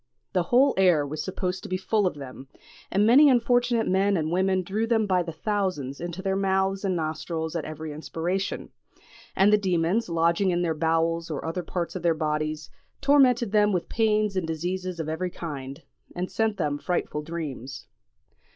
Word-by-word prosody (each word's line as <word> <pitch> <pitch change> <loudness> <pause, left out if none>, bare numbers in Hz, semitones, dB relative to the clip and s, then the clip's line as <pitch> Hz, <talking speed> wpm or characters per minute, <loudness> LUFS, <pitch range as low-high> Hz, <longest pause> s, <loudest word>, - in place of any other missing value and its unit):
The 180 - +2
whole 265 +3 +5
air 175 -6 +4
was 150 +2 -4
supposed 185 -1 -3
to - - -9
be 185 - 0
full 200 +1 +1
of 180 - -3
them, 135 -1 -9 0.4
and 200 +2 +3
many 275 +6 +7
unfortunate 245 -1 +2
men 195 +1 +2
and 155 -1 -1
women 185 +1 +1
drew 210 +5 -2
them 225 -2 +2
by 185 -3 +2
thousands 165 -5 -3
into 175 +2 -5
their 190 -1 0
mouths 195 0 0
and 190 -2 0
nostrils 160 0 -3
at 165 - -2
every 155 0 -6
inspiration; 170 +5 -3 0.6
and 200 +2 +4
the 210 - +5
demons, 185 +2 0
lodging 170 +3 +2
in 175 0 +1
their 165 -2 +1
bowels 165 +1 0
or 150 -1 -4
other 165 +3 -2
parts 175 0 -4
of 185 - -4
their 170 -1 +2
bodies, 155 -1 -2 0.3
tormented 260 -6 +4
them 210 -1 +3
with 180 - -2
pains 215 -2 +1
and 185 -3 -1
diseases 180 +2 -3
of 160 - -3
every 160 +4 -2
kind, 145 -4 -7 0.3
and 180 +1 -3
sent 220 -2 0
them 145 0 -1
frightful 175 -3 -2
dreams. 150 -5 -6
180 Hz, 180 wpm, -26 LUFS, 160-200 Hz, 0.6 s, many